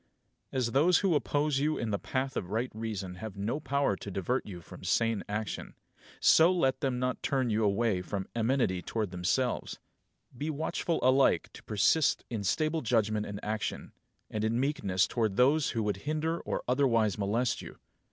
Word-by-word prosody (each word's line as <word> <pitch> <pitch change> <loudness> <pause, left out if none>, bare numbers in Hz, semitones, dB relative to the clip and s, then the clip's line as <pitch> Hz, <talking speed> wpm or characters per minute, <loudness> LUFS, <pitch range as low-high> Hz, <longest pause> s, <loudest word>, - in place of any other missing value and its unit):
9. - - -3
As 120 -2 0
those 160 +7 +4
who 195 -4 +2
oppose 145 -1 +1
you 155 +2 +1
in 115 -2 -2
the 100 - 0
path 130 +1 -2
of 90 - -3
right 115 +5 -1
reason 105 -5 -5
have 105 0 -7
no 110 +9 -2
power 140 -8 0
to 100 - -8
divert 100 +7 -1
you 90 -4 -7
from 85 - -13
sane 115 -3 +1
action, 105 +1 -4 0.4
so 165 +3 +6
let 135 -8 +1
them 130 -2 -1
not 125 0 -1
turn 130 -4 0
you 110 +1 +1
away 105 -1 +1
from 95 +1 -4
amenity 115 -6 +1
towards 105 0 -3
themselves. 95 +8 -1 0.6
Be 145 +6 -3
watchful 160 +2 -1
alike 130 - +3
to - - -11
persist 110 +8 +2
in 110 -3 -3
stable 155 - 0
judgment 110 -3 +1
and 100 0 -5
action, 110 0 -3 0.4
and 105 0 -2
in 115 +2 +1
meekness 130 -10 +1
towards 110 -5 -1
those 140 +5 +4
who 115 -2 -1
would 105 -2 -1
hinder 155 +8 -2
or - - -3
otherwise 115 -5 +2
molest 110 +5 0
you. - - -10
115 Hz, 180 wpm, -30 LUFS, 105-140 Hz, 0.6 s, so